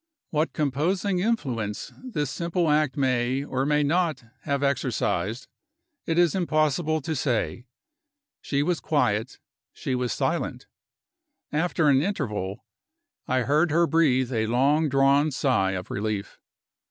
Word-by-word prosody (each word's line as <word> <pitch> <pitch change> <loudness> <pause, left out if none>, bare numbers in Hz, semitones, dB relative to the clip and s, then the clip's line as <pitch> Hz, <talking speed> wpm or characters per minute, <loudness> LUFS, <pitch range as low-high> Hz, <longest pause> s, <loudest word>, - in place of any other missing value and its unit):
What 155 +1 0
composing 170 +7 0
influence 130 - -2
this 160 - -3
simple 170 -1 0
act 150 -3 +1
may, 130 0 +1
or 135 -1 -2
may 150 0 +2
not, 155 -3 0 0.2
have 140 0 0
exercised, 120 -5 -1 0.6
it 165 - 0
is 175 -2 +4
impossible 155 -2 +1
to 160 +3 -3
say. 120 - -1 0.7
She 140 0 0
was 175 +1 0
quiet, 125 -6 0 0.4
she 130 - -4
was 125 -2 -1
silent. - - -2 0.9
After 160 0 +1
an 135 -1 +5
interval, 110 - -3 0.6
I 130 0 +1
heard 150 +7 +2
her 170 +3 +3
breathe 130 -6 +2
a 110 -1 0
long 140 +6 +2
drawn 140 +2 +4
sigh 120 -9 +1
of 90 -1 -5
relief. 105 -1 -3
140 Hz, 130 wpm, -25 LUFS, 125-160 Hz, 0.9 s, an